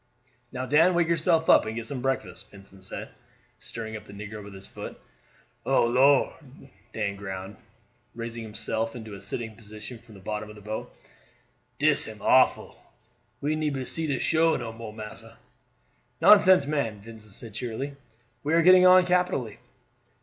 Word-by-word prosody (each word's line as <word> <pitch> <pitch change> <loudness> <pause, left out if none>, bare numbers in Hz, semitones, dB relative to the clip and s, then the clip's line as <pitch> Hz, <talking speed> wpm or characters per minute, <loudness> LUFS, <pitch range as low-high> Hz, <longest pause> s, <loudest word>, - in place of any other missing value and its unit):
"Now, 130 - -4
Dan, 160 +7 +4
wake 170 -1 +3
yourself 165 0 +2
up - - +7
and 110 - -4
get 115 -1 -4
some 130 +1 -4
breakfast," 120 -9 -3
Vincent 100 -1 -15
said, 95 - -7 0.5
stirring 110 -1 -5
up 105 - -8
the - - -13
negro 105 +1 -8
with 100 -1 -11
his 95 - -8
foot. - - -9 0.6
"Oh - - +3
Lor'!" 130 +3 +3 0.5
Dan 105 -2 -2
groaned, 95 0 -7 0.6
raising 115 0 -5
himself 110 +1 -3
into 110 -3 -8
a 100 - -9
sitting 110 +2 -4
position 110 +2 -10
from 115 -2 -17
the - - -12
bottom 105 +2 -5
of 105 - -11
the - - -12
boat, 110 +2 -5 0.9
"dis - - +2
am - - -9
awful; - - +3 0.6
we 150 +2 0
neber 145 -4 -2
see 160 +3 -3
the 140 -3 0
shore 160 +5 +2
no 115 -1 -6
more, 115 -1 -8
massa." 105 0 -10 0.8
"Nonsense, 185 -7 +7
man," 140 -9 -2
Vincent 110 -1 -11
said 110 +1 -9
cheerily; 125 +5 -4 0.5
"we 150 +3 +1
are 165 - +4
getting 185 +1 +8
on 185 0 +7
capitally." 180 - 0
115 Hz, 165 wpm, -26 LUFS, 105-150 Hz, 0.9 s, getting